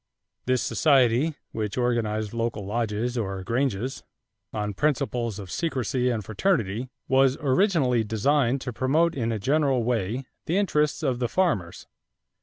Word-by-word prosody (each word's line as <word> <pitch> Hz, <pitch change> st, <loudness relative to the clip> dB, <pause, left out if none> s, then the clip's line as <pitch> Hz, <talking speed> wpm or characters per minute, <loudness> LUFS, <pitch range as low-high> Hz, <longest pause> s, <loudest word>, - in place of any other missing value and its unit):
This 130 Hz, -1 st, +2 dB
society, 135 Hz, +1 st, +3 dB, 0.2 s
which 105 Hz, -1 st, -3 dB
organized 110 Hz, -4 st, 0 dB
local 115 Hz, -3 st, -2 dB
lodges 115 Hz, +3 st, -1 dB
or 95 Hz, -3 st, -3 dB
"granges" 125 Hz, +2 st, -1 dB, 0.5 s
on 105 Hz, -1 st, -3 dB
principles 125 Hz, -4 st, -1 dB
of 95 Hz, -3 st, -8 dB
secrecy 130 Hz, -5 st, -1 dB
and 110 Hz, -5 st, -2 dB
fraternity, 115 Hz, -, 0 dB, 0.2 s
was 135 Hz, +1 st, +4 dB
originally 135 Hz, -, +2 dB
designed 125 Hz, +4 st, +1 dB
to 125 Hz, -2 st, -5 dB
promote 155 Hz, +8 st, +2 dB
in 115 Hz, -5 st, -1 dB
a 110 Hz, -, -1 dB
general 135 Hz, +2 st, +1 dB
way 120 Hz, +2 st, -1 dB, 0.2 s
the 170 Hz, -, +1 dB
interests 150 Hz, -7 st, +1 dB
of 130 Hz, -4 st, 0 dB
the 120 Hz, -2 st, 0 dB
farmers. 100 Hz, -, 0 dB
125 Hz, 135 wpm, -26 LUFS, 110-140 Hz, 0.5 s, was